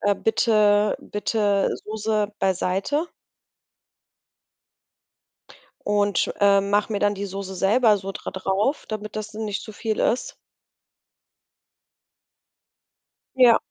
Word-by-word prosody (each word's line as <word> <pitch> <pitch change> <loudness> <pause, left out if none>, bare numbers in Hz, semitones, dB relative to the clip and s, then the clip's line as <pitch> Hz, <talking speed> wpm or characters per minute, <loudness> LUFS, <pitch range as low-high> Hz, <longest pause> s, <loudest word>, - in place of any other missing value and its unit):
„Äh, 205 0 +2
bitte, 210 -2 +2
bitte 205 -1 0 0.2
Soße 215 -1 -1
beiseite.“ 195 - 0 2.8
Und, 205 -2 +1
äh, 200 -1 +5
mache 205 +2 0
mir 205 - -1
dann 205 0 +2
die 200 0 -5
Soße 195 0 -6
selber 210 +3 +3
so 195 0 -6
dra - - -6
drauf, 195 +9 -1
damit 215 -1 -6
das 215 0 -6
nicht 215 -1 -4
zu 215 - -10
viel 220 0 -3
ist. 245 - 0 3.0
Ja. 245 -3 +6
205 Hz, 100 wpm, -23 LUFS, 200-220 Hz, 3.0 s, Ja